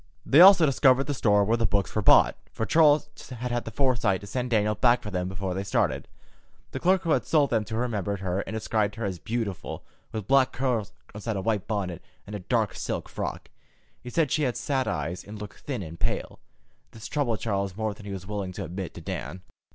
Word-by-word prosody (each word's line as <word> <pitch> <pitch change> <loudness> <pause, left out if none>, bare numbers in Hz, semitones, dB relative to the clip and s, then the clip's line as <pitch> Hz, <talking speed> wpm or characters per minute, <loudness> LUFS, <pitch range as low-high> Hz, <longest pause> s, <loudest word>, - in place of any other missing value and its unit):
They 145 +5 +6
also 185 -3 +9
discovered 135 -1 +4
the 145 - -3
store 105 -5 +3
where 115 +4 +2
the 115 -2 +2
books 100 0 0
were 110 - 0
bought, - - +6 0.2
for 110 - -3
Charles 150 +3 +4 0.2
had 125 -1 -5
had 120 0 -1
the 115 - -6
forethought 115 -6 +1
to - - -9
send 125 +4 -3
Daniel 105 -2 +2
back 120 +3 +3
for 105 - -6
them 90 -1 -2
before 95 0 -3
they 95 +2 -3
started. 100 - 0 0.6
The - - -4
clerk 185 +1 +3
who 165 - 0
had - - +1
sold 150 -4 +3
them 110 -3 +2
to 110 - -5
her 115 - 0
remembered 100 -5 -2
her, 95 0 -1
and 100 +2 -4
described 110 -2 0
her 115 -1 -4
as 95 -3 -3
beautiful, 110 -4 -4 0.3
with 110 -3 -4
black 135 -1 +4
curls 120 -5 -1 0.2
inside 105 +1 -4
a 95 - -2
white 105 -1 -1
bonnet, 95 -5 -3 0.2
and 105 - -7
a - - -4
dark 90 - 0
silk - - -4
frock. - - -5 0.5
He 125 - -8
said 155 +1 +1
she 155 - +1
had 125 -5 0
sad 135 -2 -1
eyes, 85 +2 -3
and 105 +1 -9
looked 105 -1 -9
thin 130 -8 -4
and 85 0 -9
pale. 110 +1 -2 0.5
This 110 -1 -8
troubled 125 -7 -1
Charles 100 -3 -2
more 110 -1 -1
than 105 0 -12
he - - -5
was 95 -2 -6
willing 100 -2 -4
to 100 - -5
admit 90 +2 -6
to - - -8
Dan. 95 +1 -6
110 Hz, 230 wpm, -26 LUFS, 100-125 Hz, 0.6 s, also